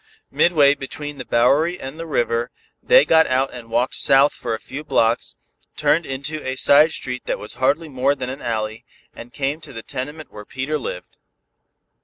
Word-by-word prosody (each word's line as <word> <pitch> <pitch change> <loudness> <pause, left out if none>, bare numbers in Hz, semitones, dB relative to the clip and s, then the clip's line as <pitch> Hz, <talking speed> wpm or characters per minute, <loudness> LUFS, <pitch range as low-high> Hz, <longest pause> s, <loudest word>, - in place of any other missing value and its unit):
Midway 145 -5 +4
between 145 +1 -7
the 125 - -6
Bowery 145 +9 +2
and 135 +4 -8
the 165 - -6
river, 120 -4 0 0.3
they - - +5
got 160 0 +4
out 130 +1 0
and 120 -2 -10
walked 120 +3 0
south 140 +1 +4
for 115 -2 -4
a - - -8
few 140 +6 -8
blocks, 115 -5 0 0.4
turned 150 +2 +2
into 140 +4 -5
a 130 0 -3
side 145 +4 +5
street 125 -4 -6
that - - -1
was 105 - -7
hardly 145 +5 +1
more 135 0 0
than 130 -2 -5
an 135 - -8
alley, 110 -1 -3 0.3
and 120 +1 -11
came 140 +4 -3
to 155 - -10
the 115 -1 -8
tenement 145 +4 -7
where 105 - -10
Peter 135 +7 -3
lived. 90 -8 -7
135 Hz, 185 wpm, -21 LUFS, 125-150 Hz, 0.4 s, they